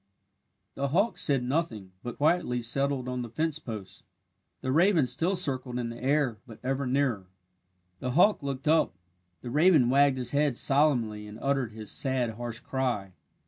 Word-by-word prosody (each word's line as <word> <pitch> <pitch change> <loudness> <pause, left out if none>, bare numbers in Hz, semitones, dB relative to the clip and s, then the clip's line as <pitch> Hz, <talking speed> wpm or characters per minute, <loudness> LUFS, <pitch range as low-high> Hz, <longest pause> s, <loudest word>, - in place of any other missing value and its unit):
The 140 +1 -2
hawk 195 +9 +1
said 135 -4 +3
nothing, 125 - -2
but 120 - -7
quietly 150 -5 +1
settled 135 +2 0
on 125 0 -3
the 120 - -6
fence 155 +5 -1
post. 105 -9 -8 0.6
The 130 - -2
raven 170 0 +4
still 175 +9 0
circled 130 -8 -1
in 120 -1 -3
the 115 +1 -9
air, 135 -5 +1
but 110 -3 -11
ever 135 +1 -1
nearer. 125 -8 0 0.7
The 125 -1 -3
hawk 190 +6 +4
looked 140 0 -5
up. 155 - +3 0.5
The 120 - -6
raven 150 -4 +4
wagged 140 0 +4
his 125 -1 -1
head 145 -3 +1
solemnly 120 -8 +2
and 105 +1 -10
uttered 135 -5 -1
his 110 -1 -4
sad, 130 -4 0
harsh 120 +1 -5
cry. 120 -9 -2
130 Hz, 165 wpm, -28 LUFS, 120-145 Hz, 0.7 s, raven